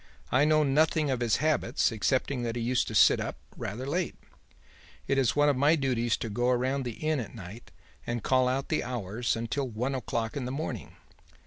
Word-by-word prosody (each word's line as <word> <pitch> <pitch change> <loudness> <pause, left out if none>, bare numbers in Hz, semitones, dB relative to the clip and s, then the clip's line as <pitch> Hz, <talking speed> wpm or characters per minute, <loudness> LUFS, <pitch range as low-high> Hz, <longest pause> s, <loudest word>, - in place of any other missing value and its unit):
I 135 +3 +4
know 155 0 +4
nothing 150 +1 +2
of 130 - -1
his 120 -3 +2
habits 155 -4 +1
excepting 125 +4 0
that 115 -1 -2
he 120 - -2
used 125 +1 +1
to - - -5
sit - - +6
up - - -4 0.2
rather 120 +6 -5
late. 170 +5 -1 0.9
It 135 - +2
is 130 -4 +2
one 145 0 +4
of 145 - +3
my 145 +5 +4
duties 125 -5 0
to 115 - -4
go 120 +4 0
round 130 +2 0
the 120 - -3
Inn 155 -2 +1
at 110 -4 -6
night 100 +6 -10 0.4
and 120 -1 -2
call 130 -1 +3
out 135 +2 -1
the 160 - 0
hours 120 -1 -2
until 115 +4 -2
one 125 +4 -2
o'clock 115 -3 -3
in 140 -3 -3
the 125 - -3
morning. 135 - -5
130 Hz, 205 wpm, -29 LUFS, 120-140 Hz, 0.9 s, sit